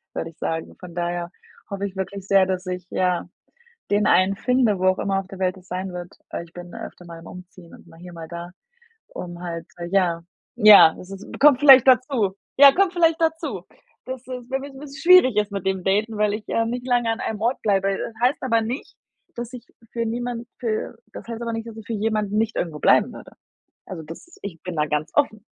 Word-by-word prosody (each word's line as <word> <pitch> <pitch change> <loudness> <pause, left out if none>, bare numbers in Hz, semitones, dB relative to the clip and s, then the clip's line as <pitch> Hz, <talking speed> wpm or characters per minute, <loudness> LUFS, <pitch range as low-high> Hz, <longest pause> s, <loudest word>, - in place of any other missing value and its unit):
würde 165 - -3
ich - - -32
sagen. 160 0 -4
Von 180 -2 -11
daher 175 0 -2 0.4
hoffe 200 0 -3
ich 195 -1 -6
wirklich 190 0 -5
sehr, 195 -1 +5
dass 185 0 -2
ich, 180 0 -5
ja, 180 -2 0 0.6
den 205 +1 +2
einen 190 +1 +3
finde, 250 -4 +2
wo 185 - 0
auch 185 - +3
immer 195 -1 0
auf 190 - -11
der 195 0 -11
Welt 185 0 0
es 180 - -19
sein 185 +1 -4
wird. 175 0 -8
Äh, 170 - -5
ich 170 - -20
bin 175 0 -10
öfter 180 - -9
mal 170 -1 -10
am 165 - -14
Umziehen 180 -1 -13
und - - -16
mal 165 0 -17
hier 180 0 -11
mal 165 -1 -9
da, 170 +1 -7 0.6
um 175 -1 -8
halt 165 -2 -5 0.2
ja, 175 -3 +2 0.4
ja, 210 -6 +8
es 185 - -12
es 195 +1 -8 0.2
kommt 285 -2 +6
vielleicht 270 -3 +8
dazu. 250 -6 +3 0.2
Ja, 280 0 +10
kommt 385 +1 +2
vielleicht 335 -2 +2
dazu. 320 - -1 0.4
Das 260 -1 -6
ist, - - -20
w 250 -1 -7
wird 280 -1 -9
'n - - -11
bisschen 280 -1 -10
schwierig 260 - +7
ist 210 0 +1
mit 195 -1 -5
dem 190 -1 0
Daten, 210 +4 0
weil 210 -1 +2
ich, 215 - -6
ähm, 230 0 0
nicht 245 +1 -5
lange 240 -2 +2
an 225 - -2
einem 215 -2 -4
Ort 235 +4 0
bleibe, 195 -2 +1
das 230 - -5
heißt 255 +4 +2
aber 230 -3 +2
nicht, 240 +5 -5 0.4
dass 240 0 -6
ich 245 -1 -10 0.3
für 235 -1 -2
niemand 240 +1 -4
für 225 -3 -3 0.2
das - - -9
heißt 230 0 -6
aber 230 -1 -3
nicht, 225 0 -4
dass 225 -1 -9
ich 220 -2 -10
für 230 - -3
jemanden 210 -1 -1
nicht 225 0 0
irgendwo 160 -3 -3
bleiben 220 +9 +4
würde. - - -12 0.5
Also 175 -4 -7
das 165 - -12
ich 170 -5 -7
bin 180 -2 -5
da 150 0 +1
ganz 150 +1 -2
offen 215 -7 +1
205 Hz, 225 wpm, -23 LUFS, 180-240 Hz, 0.6 s, Ja